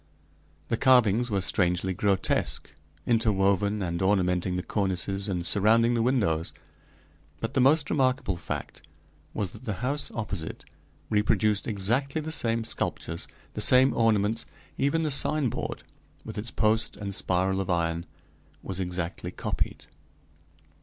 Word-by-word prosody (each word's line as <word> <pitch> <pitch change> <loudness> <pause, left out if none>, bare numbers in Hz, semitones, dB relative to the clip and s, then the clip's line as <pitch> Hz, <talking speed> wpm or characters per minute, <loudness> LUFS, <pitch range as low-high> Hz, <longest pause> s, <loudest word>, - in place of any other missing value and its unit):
The 115 - +1
carvings 125 -3 +4
were 100 -3 0
strangely 90 0 +1
grotesque, 100 +1 0 0.3
interwoven 100 -2 +2
and 85 -1 -3
ornamenting 90 -2 +1
the 90 - -2
cornices 95 0 -1
and 90 -3 -2
surrounding 115 +5 +4
the 115 - +1
windows; 105 -11 0 0.9
but 115 - -4
the 130 - +2
most 145 +3 +4
remarkable 130 -7 +1
fact - - -6 0.5
was 95 -3 -2
that 110 +5 -13
the 110 - -2
house 145 +2 0
opposite 95 -8 -5 0.5
reproduced 105 +1 +2
exactly 120 +8 0
the 155 +1 -5
same 115 -6 +1
sculptures, 85 -6 -3 0.3
the - - -4
same 130 +1 +6
ornaments; 110 0 +1 0.3
even 145 +4 +1
the 155 - 0
signboard, 140 -1 +1 0.4
with - - -7
its 110 +3 -4
post 110 0 +1
and 100 -1 -5
spiral 95 +1 0
of 95 - -5
iron, 85 0 -1 0.6
was 95 -1 -5
exactly 90 -1 -4
copied. - - -3
105 Hz, 130 wpm, -27 LUFS, 95-120 Hz, 0.9 s, same